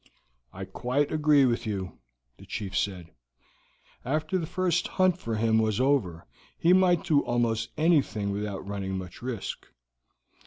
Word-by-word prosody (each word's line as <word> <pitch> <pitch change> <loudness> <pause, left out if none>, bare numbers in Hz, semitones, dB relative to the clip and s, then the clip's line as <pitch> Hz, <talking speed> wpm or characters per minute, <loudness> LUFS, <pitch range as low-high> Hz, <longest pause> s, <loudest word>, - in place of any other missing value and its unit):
"I - - -7
quite 140 +4 -1
agree 150 -3 +4
with 120 -2 0
you," 95 -3 -4 0.4
the - - -14
chief 95 -3 -5
said. 90 -4 -2 0.9
"After 155 +7 -1
the 165 - -4
first 180 -1 0
hunt 185 -1 +2
for 115 -8 -3
him 110 0 +2
was 110 0 +1
over, 120 -12 +1 0.3
he 170 +2 +4
might 185 -2 +4
do 160 -6 +3
almost 115 -1 0
anything 145 -11 +2
without 100 -1 -4
running 95 -1 -3
much 90 -2 -8
risk. 125 -4 -5
120 Hz, 145 wpm, -27 LUFS, 100-155 Hz, 0.9 s, agree